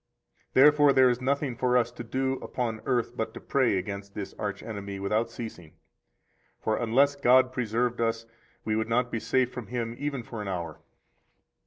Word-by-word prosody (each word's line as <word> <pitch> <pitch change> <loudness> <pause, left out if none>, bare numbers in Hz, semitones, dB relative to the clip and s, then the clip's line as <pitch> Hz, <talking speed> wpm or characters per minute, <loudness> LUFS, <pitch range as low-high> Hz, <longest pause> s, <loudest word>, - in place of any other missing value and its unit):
116 130 - +7
Therefore 145 -1 +6
there 130 -1 +6
is 120 +1 -3
nothing 140 -1 0
for 125 +1 +2
us 120 -1 +1
to 120 0 -8
do 130 +3 -1
upon 115 -3 -3
earth 120 -2 0
but 110 -2 -3
to - - -6
pray 130 -7 +1
against 100 +1 -5
this 100 -2 -5
arch 100 -2 -3
enemy 100 -2 -6
without 105 +4 0
ceasing. 110 -9 -9 0.8
For 110 - 0
unless 135 +5 +3
God 130 -1 +4
preserved 120 0 -1
us, 115 0 0 0.4
we 110 - 0
would 110 +1 -1
not 125 +1 +1
be 115 - -1
safe 130 +2 +1
from 125 -3 -6
him 120 -1 -3
even 145 -4 -3
for 115 -2 -7
an 105 - -5
hour. 85 -5 -4
120 Hz, 185 wpm, -28 LUFS, 110-130 Hz, 0.8 s, 116